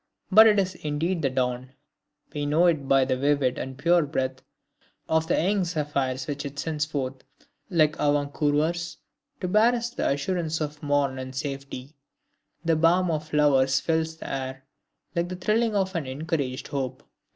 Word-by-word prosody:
But 220 +3 +9
it 210 -1 +4
is 190 -1 +1
indeed 165 +2 -2
the 135 - +1
dawn; 130 0 -2 0.6
we 145 -1 -2
know 155 +4 +3
it 155 -6 +2
by 135 -1 +4
the 130 0 0
vivid 140 -1 +1
and 130 0 -6
pure 170 +4 +4
breath 130 -3 -2 0.7
of 160 0 +1
the - - +2
young 195 +3 +2
zephyrs 140 -6 -2
which 145 0 -4
it 140 -1 -7
sends 150 0 -1
forth, 135 -4 -4 0.5
like 155 -4 +3
avant 145 -1 +1
coureurs, 160 +2 0 0.4
to 180 - -1
bear 215 +6 +4
us 240 0 -3
the - - -1
assurance 160 +3 -1
of 150 -1 -4
morn 145 -2 0
and 130 0 -7
safety. 140 0 -5 0.7
The 165 -1 +3
balm 170 +3 +3
of 155 -1 -2
flowers 135 -3 +3
fills 160 +1 -1
the - - -8
air, 130 0 -5 0.5
like 170 +1 0
the 185 - -4
thrilling 215 +4 +1
of 190 -1 0
an 160 -5 -2
encouraged 140 -1 -3
hope. 130 -2 -4
150 Hz, 170 wpm, -26 LUFS, 135-170 Hz, 0.7 s, But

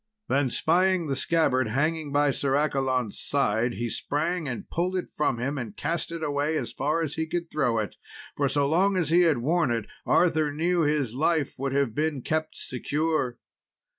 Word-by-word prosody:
Then 135 0 +2
spying 180 +6 +2
the 140 -3 -1
scabbard 130 -4 +2
hanging 150 +5 -1
by 145 0 +3
Sir 135 0 0
Accolon's 135 -6 0
side, 120 -3 +1
he 120 +1 -3
sprang 160 +7 -2
and 120 -3 -5
pulled 180 +2 -1
it 180 - -4
from 145 -5 +1
him, 135 +4 -2
and 110 -5 -7
cast 170 0 -2
it 165 -1 -5
away 145 +1 0
as 125 - -4
far 155 +5 0
as 150 -2 -3
he 160 +1 -2
could 170 0 -3
throw 130 -7 +1
it; 105 -3 -3 0.4
for 140 -1 +1
so 140 +1 +2
long 185 +6 +2
as 170 -5 0
he 175 +2 +6
had 165 -6 +4
worn 155 +4 +1
it, 115 -3 -1 0.2
Arthur 160 -4 +3
new 170 +4 +1
his 145 -6 +1
life 155 +1 +1
would 135 0 -2
have 140 -5 +1
been 150 -1 -1
kept 155 0 -2
secure. 145 -1 -1
145 Hz, 190 wpm, -26 LUFS, 130-160 Hz, 0.4 s, he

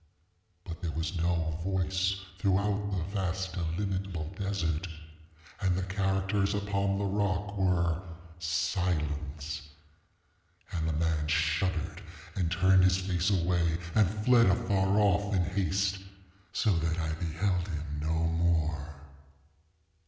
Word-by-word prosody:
But 85 -2 -8
there 85 - -2
was 80 +3 -2
no 85 -2 0
voice 95 +1 0 0.2
throughout 100 +2 +1
the 95 -4 -1
vast 95 -2 -2
illimitable 90 -1 -2
desert, 95 -4 -1 0.7
and 95 -2 +2
the 95 - -1
characters 95 +1 0
upon 100 -1 0
the 100 - -1
rock 100 0 -1
were 90 -3 +1 0.4
SILENCE. 80 -4 -1 1.1
And 80 -2 -1
the - - 0
man 80 -1 0
shuddered, 80 +2 0 0.3
and 85 -3 0
turned 95 +1 +5
his 95 0 +5
face 95 -1 0
away, 85 -3 +2 0.2
and 105 -5 +4 0.2
fled 120 -3 +6
afar 95 +1 +2
off, 100 0 +3
in 90 - +3
haste, 95 +1 0 0.5
so 110 - +2
that 80 +1 0
I 80 -2 -1
beheld 85 +2 -1
him 75 -3 -4
no 80 +2 0
more. 80 -3 0
90 Hz, 120 wpm, -30 LUFS, 80-95 Hz, 1.1 s, fled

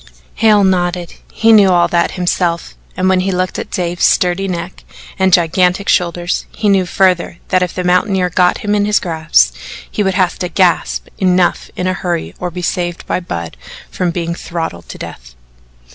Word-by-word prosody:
Hale 215 -2 +4
nodded 175 -2 0 0.2
he 225 0 +3
knew 205 -3 +6
all 175 -1 +3
that 170 -1 +1
himself, 175 -1 -1 0.2
and 185 0 +1
when 190 0 +3
he 190 +1 0
looked 185 0 -2
at - - -6
Dave's 175 -1 -2
sturdy 180 +2 +2
neck, 180 0 -5 0.4
and 190 0 +3
gigantic 180 +3 +2
shoulders, 175 0 0
he 210 - 0
knew 190 -2 +2
further 180 -2 +1
that 185 -1 +2
if 180 -1 -2
the 180 - -2
mountaineer 180 0 +1
got 180 +1 +2
him 205 - +1
in 205 -1 +2
his 210 0 +2
grasp 160 - +1 0.4
he - - -2
would 190 -2 0
have 185 -2 +1
to 180 - -2
gasp 180 0 +1
"enough" 180 -2 +1
in 180 - -3
a 185 - +1
hurry, 175 -3 -3
or 180 - -3
be 180 +1 -7
saved 175 0 -2
by - - -1
Budd 85 - -6 0.4
from 180 - -1
being 170 0 -3
throttled 165 - -6
to - - -8
death. - - -10
180 Hz, 185 wpm, -15 LUFS, 175-190 Hz, 0.4 s, knew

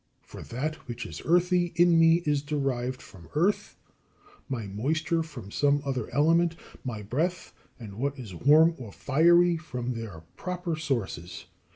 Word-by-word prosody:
For - - -11
that 150 +6 -4
which 120 0 -5
is - - -8
earthy 175 0 +2
in 170 -1 +5
me 165 +1 +5
is 145 -2 +1
derived 135 -4 -2
from 85 -4 -15
earth, 180 +7 +1 0.7
my 120 -5 -3
moisture 150 - -1
from 135 -11 -8
some 145 +3 +2
other 130 -5 -3
element, 165 +5 +3 0.3
my 115 -6 -5
breath 160 - -2 0.3
and 105 -3 -9
what 140 +2 -1
is 115 -7 -8
warm 155 - +5
or 115 -5 -8
fiery 170 - +4
from 125 -6 -4
their 110 -9 -7
proper 180 -2 -3
sources. 115 - -3
145 Hz, 150 wpm, -27 LUFS, 120-165 Hz, 0.7 s, in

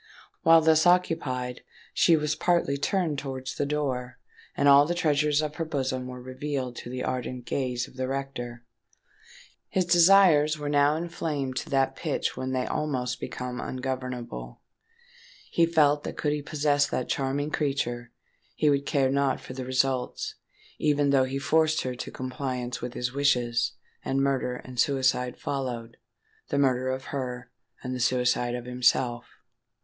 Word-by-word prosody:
While 165 0 +7
thus 160 +1 +4
occupied, 135 -8 +1 0.3
she 165 -2 +5
was 150 0 0
partly 170 -4 +1
turned 155 0 0
towards 130 -1 -5
the 145 - -2
door; 130 -4 -2 0.4
and 145 - +3
all 140 +1 +7
the 175 - -1
treasures 150 -2 +2
of 150 -1 -4
her 165 - -1
bosom 130 -4 -2
were 125 0 -7
revealed 130 0 -4
to - - -7
the 125 0 -4
ardent 125 -1 -3
gaze 125 -2 -2
of - - -17
the 130 0 -1
rector. 130 -3 -5 1.0
His 185 -1 +1
desires 175 -4 +6
were 145 -1 -4
now 145 +1 +4
inflamed 155 -5 -3
to - - -3
that 135 -1 +1
pitch - - -2
when 130 0 -3
they 130 -1 0
almost 130 -5 -2
become 125 0 -5
ungovernable. 125 - -5 0.9
He 165 -1 +3
felt 150 -3 +3
that - - -6
could 150 -1 0
he 150 - -2
possess 145 -1 +1
that 130 - -2
charming 140 +2 -1
creature, 120 -5 -2 0.4
he 150 +4 +3
would 140 0 0
care 135 -2 +2
not 140 -1 +1
for - - -9
the 130 0 -5
result—even 135 +2 -1
though 135 -2 +4
he 135 +1 -3
forced 155 +2 +2
her 130 - -2
to 125 - -6
compliance 125 -1 -4
with 125 0 -5
his 125 +1 -2
wishes, 120 -4 +1 0.3
and 135 - 0
murder 135 -2 0
and 125 0 -9
suicide 130 -2 +1
followed,—the 120 -1 -6
murder 130 -2 +2
of 130 0 -3
her, 125 -2 -4 0.3
and 130 - -3
the 125 - -4
suicide 125 0 +1
of 120 -1 -6
himself! 125 -1 +1
135 Hz, 155 wpm, -27 LUFS, 125-145 Hz, 1.0 s, While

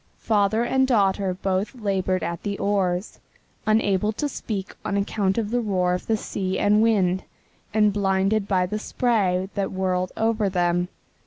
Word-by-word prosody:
Father 215 +1 +1
and 265 +2 +2
daughter 195 -5 +2
both 190 +5 -2
labored 190 -5 -1
at 170 0 -3
the 200 -1 -3
oars, 195 -1 -1 0.5
unable 210 -1 +2
to 295 +7 -2
speak 210 -7 -5
on 200 - -1
account 200 0 0
of 220 -2 -1
the 245 0 +1
roar 185 -5 +1
of 180 - -4
the 225 - +2
sea 190 -2 -3
and 210 +1 +3
wind, 190 -5 +2 0.5
and 210 -1 +3
blinded 195 +1 +1
by 185 -3 +2
the 210 +4 -3
spray 195 -6 0
that 200 -2 -2
whirled 185 -1 -1
over 220 -2 +1
them. 175 -1 +1
200 Hz, 160 wpm, -24 LUFS, 185-215 Hz, 0.5 s, and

